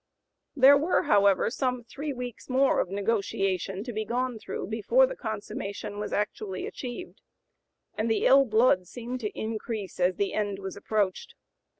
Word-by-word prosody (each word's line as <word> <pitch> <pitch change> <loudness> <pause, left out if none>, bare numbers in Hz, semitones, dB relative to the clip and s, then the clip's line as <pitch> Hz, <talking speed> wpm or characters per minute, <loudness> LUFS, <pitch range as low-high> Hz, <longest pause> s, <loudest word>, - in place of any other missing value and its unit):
There 280 +1 +7
were, 330 +5 +2
however, 200 +1 +4
some 250 -1 -1
three 285 +5 -5
weeks 245 -2 -7
more 265 +1 +3
of - - 0
negotiation 195 -2 -1
to 245 - -6
be 215 0 -2
gone 245 +1 -2
through - - -5
before 225 - +3
the - - -5
consummation 205 - -5
was 210 - -4
actually 205 -2 -2
achieved, 255 +8 -7 0.7
and 220 +2 -1
the 225 - +1
ill 275 +1 +7
blood 220 -5 +3
seemed 245 +5 -6
to 210 -4 -5
increase 220 -3 -4
as 180 0 +2
the 200 +1 -1
end 205 -2 -1
was 190 -1 -6
approached. 200 -2 -2
220 Hz, 160 wpm, -27 LUFS, 200-250 Hz, 0.7 s, There